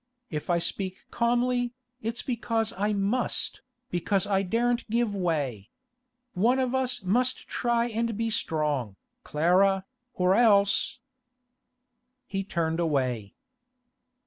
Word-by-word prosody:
If 150 +1 -4
I 175 - +4
speak 185 +2 -3
calmly, 245 +1 +1 0.3
it's 225 +2 -3
because 230 -3 -1
I 205 +3 0
must, 205 +5 -1 0.3
because 190 +3 +1
I 195 -1 +2
daren't 235 +5 0
give 230 -1 +1
way. 145 - -1 0.6
One 230 +8 +3
of 260 -1 0
us 250 -3 0
must 245 +7 +1
try 235 -1 +1
and 230 -1 -1
be 230 0 -1
strong, 150 - -1 0.3
Clara, 190 +5 +3 0.3
or 180 0 +3
else—' 200 -3 +4 1.3
He 195 -3 -3
turned 165 -3 -1
away. 130 - 0
200 Hz, 115 wpm, -27 LUFS, 170-235 Hz, 1.3 s, I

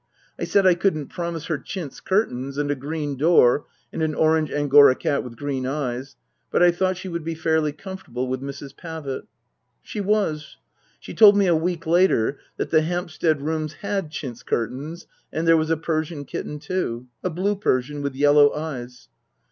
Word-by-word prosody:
I - - -1
said 200 -1 +3
I 185 - +7
couldn't 170 -5 0
promise 170 -3 -4
her 160 -4 -2
chintz 165 0 -7
curtains 140 - -1
and 145 0 0
a - - 0
green 145 +1 -4
door 145 -3 +4 0.3
and - - -3
an 155 -1 0
orange 155 -1 +2
Angora 145 -2 +6
cat 140 - -1
with 120 -2 -9
green 135 0 -3
eyes, 135 -1 -3 0.3
but - - +3
I 175 - +7
thought 185 +1 0
she 185 - -7
would 170 -2 -4
be 165 +1 -3
fairly 160 -1 +1
comfortable 175 -7 -6
with 130 0 -3
Mrs. 140 0 -7
Pavitt. 160 -6 -6 0.6
She 210 - -5
was. 195 -7 -1 0.4
She - - -9
told 205 -2 +8
me 200 - +4
a 175 -2 +4
week 165 +1 -1
later 160 -7 +3 0.2
that - - -3
the 155 - +5
Hampstead 160 -3 -1
rooms 155 0 -2
had 200 -2 -3
chintz 130 -6 -6
curtains 135 +9 -3 0.3
and 165 +1 -2
there 165 - +7
was 155 0 +1
a 165 - +2
Persian 155 -2 -2
kitten 150 - -5
too. 145 -7 -3 0.2
A 185 - 0
blue 190 +5 0
Persian, 145 -7 -1
with 140 -2 -3
yellow 145 +1 +5
eyes. 125 -5 -6
155 Hz, 180 wpm, -23 LUFS, 140-175 Hz, 0.6 s, told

